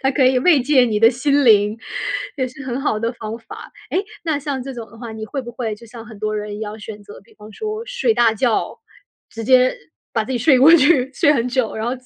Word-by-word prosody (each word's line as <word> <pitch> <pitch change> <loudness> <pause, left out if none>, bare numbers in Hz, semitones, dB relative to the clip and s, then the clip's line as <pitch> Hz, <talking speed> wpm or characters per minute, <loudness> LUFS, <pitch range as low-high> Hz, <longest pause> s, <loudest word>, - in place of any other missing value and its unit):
它 265 - +1
可 265 - +2
以 255 0 +4
慰 290 0 +4
藉 270 0 +4
你 215 -3 -1
的 225 +1 +7
心 280 +3 +1
灵， 210 -2 +4 0.6
也 260 -3 -1
是 265 +2 -10
很 255 0 -3
好 220 -6 -1
的 230 +1 -1
方 220 -1 -6
法。 230 -1 -12 0.2
诶， - - +1 0.2
那 315 -3 -1
像 280 -2 -4
这 270 +1 -7
种 235 -3 -8
的 230 - -16
话， 235 0 -8
你 220 0 -7
会 270 +5 -4
不 240 - -8
会 235 -3 -4
就 220 +3 -16
像 230 0 -11
很 220 -1 -12
多 215 0 -2
人 210 0 -5
要 215 0 -6
选 210 -1 -9
择， 205 - -13
比 230 - -23
方 215 0 -14
说 430 - -5
睡 - - 0
大 235 - +4
觉， 225 +1 -1 0.5
直 225 - -8
接 255 +2 +4 0.4
把 225 - +1
自 220 - -9
己 255 - -1
睡 260 +3 +4
过 275 +6 +7
去， 275 -3 +3
睡 290 +2 +3
很 245 -4 0
久， 250 -3 -1
然 220 - -4
后 240 - -1
245 Hz, 270 characters per minute, -19 LUFS, 220-270 Hz, 0.6 s, 的